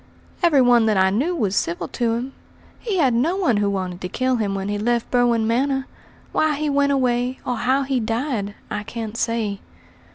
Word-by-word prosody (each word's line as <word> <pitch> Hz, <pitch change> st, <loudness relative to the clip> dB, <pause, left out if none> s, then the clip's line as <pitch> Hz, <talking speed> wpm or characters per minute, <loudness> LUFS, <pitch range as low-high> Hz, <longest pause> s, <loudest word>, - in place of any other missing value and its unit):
"Every 325 Hz, -6 st, +5 dB
one 240 Hz, -2 st, +5 dB
that 215 Hz, -2 st, +2 dB
I 190 Hz, 0 st, +4 dB
knew 290 Hz, -, 0 dB
was 205 Hz, -, 0 dB
civil 170 Hz, -3 st, -1 dB
to 235 Hz, -2 st, 0 dB
him; 255 Hz, +3 st, -4 dB, 0.5 s
he 425 Hz, -5 st, -2 dB
had 270 Hz, -8 st, +3 dB
no 285 Hz, +10 st, +1 dB
one 330 Hz, -, +2 dB
who 205 Hz, -1 st, +1 dB
wanted 185 Hz, -2 st, -3 dB
to 180 Hz, -, -4 dB
kill 255 Hz, +5 st, 0 dB
him 205 Hz, -3 st, -1 dB
when 195 Hz, 0 st, -3 dB
he 205 Hz, 0 st, -2 dB
left 235 Hz, +2 st, 0 dB
Berwin 240 Hz, -2 st, +3 dB
Manor. 270 Hz, +4 st, 0 dB, 0.5 s
Why 310 Hz, -1 st, +1 dB
he 300 Hz, 0 st, -1 dB
went 280 Hz, 0 st, +2 dB
away, 250 Hz, -1 st, +1 dB
or 250 Hz, -, -1 dB
how 265 Hz, +4 st, +1 dB
he 270 Hz, -1 st, 0 dB
died, 225 Hz, -2 st, -2 dB, 0.2 s
I 210 Hz, -, -2 dB
can't 225 Hz, 0 st, -6 dB
say." 230 Hz, -4 st, -1 dB
240 Hz, 200 wpm, -22 LUFS, 210-270 Hz, 0.5 s, Every